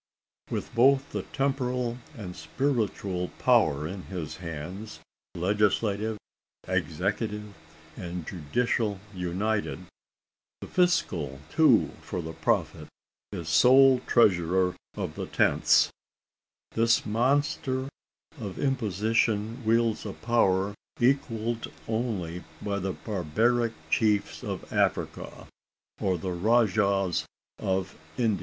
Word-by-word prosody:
With - - -4
both 135 +3 +4
the - - -2
temporal 125 -3 -1 0.2
and 90 -5 -7
spiritual 100 - -1
power 75 0 +3
in 95 +3 -6
his 90 -6 -5
hands; 90 +6 -7 0.4
legislative, 105 +3 +1 0.5
executive, 105 -1 -2 0.4
and 85 -1 -5
judicial 100 - -1
united 95 +4 -2 0.7
the - - -7
fiscal 105 - +1
too, 160 0 +5
for - - -5
the 80 -1 -5
prophet - - -1 0.4
is 85 -6 -5
sole 130 +8 +6
treasurer 90 -4 +3 0.2
of - - -3
the - - -5
tenths - - +3 0.8
this 115 0 +3
monster 130 +3 +1 0.5
of 100 -5 -6
imposition 115 -1 0
wields 115 0 +2
a 100 - -5
power 100 -4 +2 0.3
equalled 120 -3 0 0.2
only 100 -7 -2 0.2
by 100 -1 -2
the 95 0 -2
barbaric 110 +5 0 0.2
chiefs 105 -3 +1
of - - -5
Africa, - - -1 0.5
or 95 -2 +1
the 90 +2 -4
rajahs 100 -2 +2 0.4
of 95 0 -1 0.2
Ind. 115 -5 +1
105 Hz, 100 wpm, -28 LUFS, 90-120 Hz, 0.8 s, sole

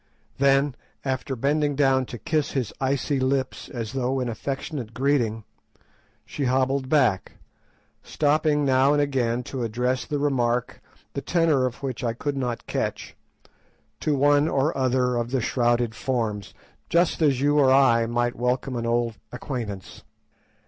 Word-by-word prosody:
Then, 140 0 +3 0.3
after 135 +1 -2
bending 145 +3 +1
down 135 -2 +2
to 120 - -7
kiss 155 +3 -1
his 125 -6 -2
icy 135 +1 0
lips 130 0 -1
as 115 -4 -5
though 130 0 -1
in 125 -2 -2
affectionate 130 0 -5
greeting, 120 -4 +1 0.8
she 140 - -3
hobbled 130 +1 +1
back, 125 -11 +2 0.7
stopping 150 0 +1
now 135 +1 +4
and 145 - +2
again 125 -4 0
to 130 +1 -5
address 125 +3 -1
the 145 - -2
remark, 125 -4 0 0.3
the - - -3
tenor 160 -7 +2
of 125 +2 -8
which 130 -3 -4
I 115 -2 0
could 140 +4 -3
not 125 -3 -3
catch, - - -3 0.8
to 150 - 0
one 145 +2 +4
or 145 +1 +1
other 125 -2 +1
of 120 0 -2
the 130 +1 0
shrouded 120 -1 +1
forms, 115 -5 -3 0.3
just 170 0 +2
as 140 -5 +3
you 145 +2 +3
or 135 -2 +5
I 125 -4 +4
might 120 +1 0
welcome 125 +1 -1
an 115 0 -2
old 115 -1 0
acquaintance. 120 -6 -6
130 Hz, 150 wpm, -24 LUFS, 120-140 Hz, 0.8 s, or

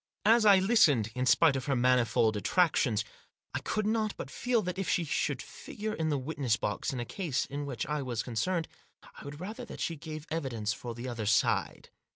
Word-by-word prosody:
As 225 0 +5
I 200 -2 +8
listened, 160 - +4
in 125 0 -1
spite 135 +4 +5
of 135 -1 -3
her 140 -2 +1
manifold 120 -3 +3
attractions, 120 - +2 0.5
I - - -1
could 215 0 -2
not 215 -1 0
but 135 - -7
feel 245 -3 0
that 180 +1 -4
if 195 - -2
she 175 - +2
should 145 -2 -1
figure 215 +1 -6
in 160 -5 -1
the 145 - +1
witness 130 -4 -1
box, 105 - -2
in 130 - -4
a 120 - -3
case 165 - -2
in 145 +1 -5
which 130 -4 -3
I 150 +1 -2
was 120 -4 -3
concerned, 165 +9 -1 0.5
I - - -12
would 145 0 -8
rather 215 +8 -6
that - - -10
she 165 - -2
gave 155 0 -7
evidence 120 -9 -2
for 120 +1 -7
the 120 +2 -6
other 120 -4 -4
side. 115 +2 +1
145 Hz, 205 wpm, -30 LUFS, 120-180 Hz, 0.5 s, I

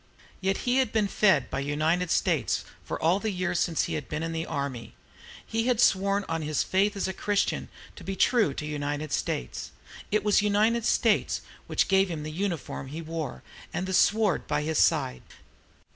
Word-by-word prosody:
Yet 195 0 +1
he 250 +1 +2
had 260 -5 +2
been 215 -2 +2
fed 190 - +3
by - - -1
"United 155 +5 0
States" - - +1 0.2
for - - -4
all 170 +4 +3
the 220 - -2
years 180 -3 -1
since 170 -2 +1
he - - -3
had 145 - -4
been 150 +1 -3
in 165 - -2
the 165 0 -3
army. 140 -6 -4 0.5
He 225 +1 -1
had 245 -3 +2
sworn 200 -2 +3
on 165 0 -2
his 150 -1 0
faith 200 +3 +1
as 200 - -1
a 190 - -3
Christian 205 +1 -1 0.3
to - - -10
be 195 - -4
true 215 - +3
to 150 - -4
"United 145 0 -3
States." 60 - -3 0.4
It 210 -1 +1
was 210 -1 +4
"United 215 +3 +2
States" - - +2 0.3
which - - +1
gave 195 0 +3
him 160 -3 -4
the 155 - -5
uniform 170 -5 -3
he 155 +5 -6
wore, 155 - -5 0.3
and 180 - -2
the 190 - -3
sword 210 -1 +3
by 150 0 0
his 155 0 0
side. 65 -1 +2
180 Hz, 190 wpm, -27 LUFS, 150-205 Hz, 0.5 s, was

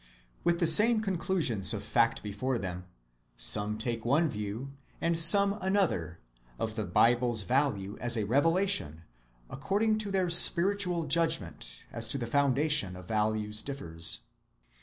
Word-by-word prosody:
With 170 0 0
the 170 - +1
same 215 +8 +7
conclusions 175 - -1
of - - -7
fact - - -1
before 120 +5 -4
them, 90 -3 -7 0.5
some 105 +1 -2
take 115 0 -5
one 150 +7 0
view, 105 +5 -7 0.3
and 170 0 -1
some 200 +4 +6
another, 185 - -2 0.4
of 110 - -5
the 110 -2 -4
Bible's 120 +3 +1
value 115 -6 -2
as 120 -1 0
a 105 - -2
revelation, 145 - -1 0.4
according 215 - -2
as 200 - -7
their 185 -3 -1
spiritual 175 0 +5
judgment 160 - -3
as 115 -1 -3
to 140 - -3
the 120 - -5
foundation 140 -5 -1
of 90 0 -12
values 110 0 -3
differs. 80 - -5
130 Hz, 140 wpm, -28 LUFS, 105-170 Hz, 0.5 s, same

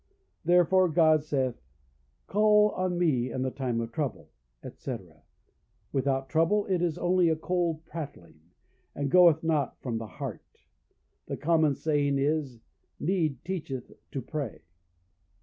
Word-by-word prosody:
Therefore 180 +2 +4
God 155 -2 +4
saith, 135 - -1 0.6
"Call 210 0 +4
on 185 -1 -1
me 135 -8 +1
in 130 - -2
the 130 - -1
time 125 -4 -2
of 115 0 -4
trouble," 130 -8 -4 0.3
etc., - - -8 0.7
without 135 0 0
trouble 165 +8 +2
it 185 -3 0
is 170 -3 0
only 180 -1 +3
a 160 - +2
cold 165 -1 -1
prattling, 140 - -8 0.6
and 140 -1 -2
goeth 170 -3 +6
not 155 -5 0
from 115 -4 -2
the 115 - -6
heart; - - -8 0.7
the - - -4
common 155 -2 +2
saying 145 -2 +1
is 140 -4 -1 0.4
"Need 160 -4 -1
teacheth 155 -9 -5 0.2
to 135 - -5
pray." 135 - -5
155 Hz, 130 wpm, -28 LUFS, 135-175 Hz, 0.7 s, goeth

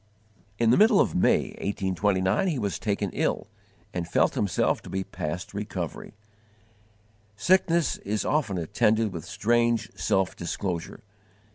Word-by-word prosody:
In 115 0 +3
the - - +5
middle 215 0 +6
of - - +2
May, 90 - +2
1829, 95 - 0
he 165 -6 0
was 100 -5 -2
taken 100 -2 -1
ill - - -1 0.5
and 85 -2 -3
felt - - +2
himself 100 -3 0
to - - -11
be 95 0 -2
past 85 +1 -5
recovery. 100 -4 -5 1.2
Sickness 170 - +2
is 105 +1 -3
often 125 -11 0
attended 105 +5 +1
with 85 -3 -6
strange 115 0 +1
_self 95 -4 0
disclosure. 85 0 -4
100 Hz, 130 wpm, -26 LUFS, 95-115 Hz, 1.2 s, middle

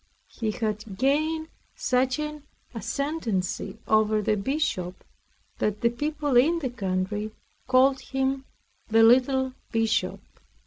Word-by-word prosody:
He 225 -3 -3
had 215 -2 -3
gained 310 +6 +1 0.3
such 255 0 +1
an 300 0 -4 0.3
ascendancy 225 - -2
over 215 0 +3
the 215 - +2
Bishop, 195 - -2 0.6
that 210 +1 -1
the 235 -1 +3
people 295 +2 -1
in 315 +8 +5
the 270 -7 -3
country 205 -1 -2 0.4
called 260 +1 +4
him 270 0 -1 0.4
the 225 +1 +5
Little 260 +2 +4 0.2
Bishop. 225 +2 +1
245 Hz, 115 wpm, -26 LUFS, 215-275 Hz, 0.6 s, in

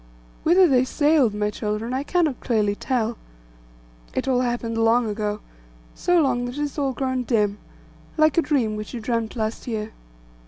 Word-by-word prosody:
Whither 360 +3 +5
they 255 -4 +4
sailed, 290 -5 +2
my 210 0 0
children, 215 +3 -3
I 260 - 0
cannot 310 -3 0
clearly 215 -4 +1
tell. 230 0 -2 1.0
It - - -1
all 255 -2 +2
happened 240 -2 -2
long 225 +1 +3
ago; 210 0 -3 0.5
so 355 -1 +2
long 250 -5 +1
that 245 +3 -6
it - - -2
has 295 0 -3
all 275 -2 +1
grown 260 -1 -1
dim, 210 -4 0 0.6
like 310 0 +4
a 335 - +4
dream 270 -8 0
which 215 +4 -6
you - - -4
dreamt 230 0 -2
last 220 +1 -3
year. 220 -2 -3
245 Hz, 170 wpm, -23 LUFS, 220-275 Hz, 1.0 s, Whither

